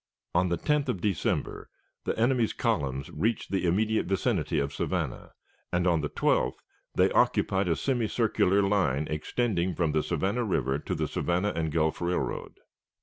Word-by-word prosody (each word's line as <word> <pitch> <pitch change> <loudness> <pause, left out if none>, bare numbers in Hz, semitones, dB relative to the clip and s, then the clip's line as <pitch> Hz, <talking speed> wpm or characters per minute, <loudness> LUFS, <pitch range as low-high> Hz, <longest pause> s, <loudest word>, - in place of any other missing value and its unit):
On 90 +1 +2
the 85 - 0
10th 150 - 0
of 105 - -1
December 95 -2 -1 0.4
the - - -1
enemy's 120 0 +2
columns 70 -1 -1
reached 115 +1 -1
the 95 -2 +1
immediate 110 +5 +1
vicinity 95 -4 0
of 70 -1 -1
Savannah, - - -3 0.4
and 85 +1 +1
on 85 -3 +3
the 75 - -2
12th - - +1 0.4
they - - +4
occupied 95 0 +2
a 85 - +2
semicircular 110 -5 +1
line 90 -8 +1
extending 90 +2 -1
from 85 -4 +1
the 75 +1 +2
Savannah 95 +10 -1
River 70 - 0
to - - -3
the - - -1
Savannah 90 +4 0
and 80 -1 -1
Gulf 80 +1 0
Railroad. 90 +1 -2
90 Hz, 155 wpm, -28 LUFS, 80-110 Hz, 0.4 s, they